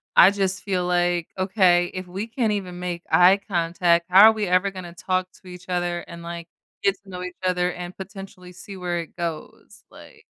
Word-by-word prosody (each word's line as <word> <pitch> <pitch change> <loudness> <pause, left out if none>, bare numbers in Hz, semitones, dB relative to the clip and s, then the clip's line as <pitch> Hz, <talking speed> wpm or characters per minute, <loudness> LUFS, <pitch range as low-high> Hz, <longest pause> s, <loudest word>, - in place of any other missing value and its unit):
I 185 - +8
just 190 -2 -2
feel 185 -3 -1
like, 175 -1 +1
okay, 185 -2 +3
"If 185 -1 -6
we 195 +5 -5
can't 230 -1 -1
even 185 -4 -4
make 175 -1 -4
eye 180 +2 +6
contact, 170 -1 +1
how 195 +4 +9
are - - +4
we 215 -1 -2
ever 185 +2 +2
gonna 185 -3 -9
talk 185 +1 -2
to 190 - -17
each 180 0 -12
other 175 -1 -1
and, 170 -1 -11
like, 170 0 -7 0.4
get 195 - +3
to 200 - -17
know 180 -1 -7
each 180 -1 -7
other 180 -1 +1
and 180 0 -8
potentially 195 -1 -10
see 190 +2 -11
where 175 -1 -2
it 165 - -8
goes?" 170 -3 -7
Like - - -16
180 Hz, 200 wpm, -23 LUFS, 175-190 Hz, 0.4 s, how